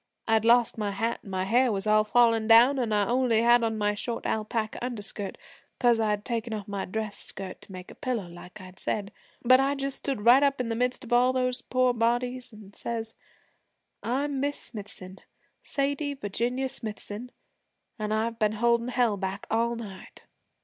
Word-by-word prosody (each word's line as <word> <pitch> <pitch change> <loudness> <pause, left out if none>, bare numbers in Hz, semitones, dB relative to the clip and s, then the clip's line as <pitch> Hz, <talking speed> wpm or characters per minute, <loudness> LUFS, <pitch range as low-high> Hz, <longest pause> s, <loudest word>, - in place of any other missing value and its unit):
I 225 - +2
had 220 0 +3
lost 235 -1 +4
my 210 -1 -1
hat 225 +4 -2
and - - -13
my 185 -1 -1
hair 245 +5 +3
was 195 0 -1
all 215 0 +4
falling 225 0 +3
down, 240 +5 +7
an' 235 -3 -1
I 205 -1 +2
only 240 -2 +2
had 240 +1 +5
on 225 -1 0
my 210 -1 +1
short 230 +3 -4
alpaca 220 +1 -2
underskirt, 210 -4 -4 0.4
'cause 240 -2 +3
I'd 210 -2 0
taken 230 -1 -2
off 205 -1 -6
my 200 -1 -3
dress 215 +1 -4
skirt 190 -1 -6
to - - -13
make 185 -1 -9
a - - -10
pillow 245 -9 -3
like 175 +3 -12
I 185 -1 -11
said; 205 +1 -3 0.3
but 255 +2 +6
I 275 +1 +2
just 275 -1 -3
stood 260 -7 -3
right 245 +3 +8
up 280 -1 +2
in 245 -2 -2
the 230 - -1
midst 250 +3 -1
of 240 -1 -4
all 250 +1 +4
those 255 -1 0
poor 255 -1 +1
bodies, 245 +2 0
an' 210 -2 -14
says, 225 0 -4 0.9
"I'm 275 +3 -1
Miss 285 +1 -1
Smithson 195 -4 -5 0.4
Sadie 285 0 -1
Virginia 245 +3 -2
Smithson 220 0 -5 0.7
an' 215 0 -2
I've 225 +1 -1
been 215 -1 +2
holdin' 235 +2 +2
Hell 240 -4 +1
back 190 +1 -4
all 230 +1 +1
night." 200 -5 -10
230 Hz, 190 wpm, -27 LUFS, 210-250 Hz, 0.9 s, right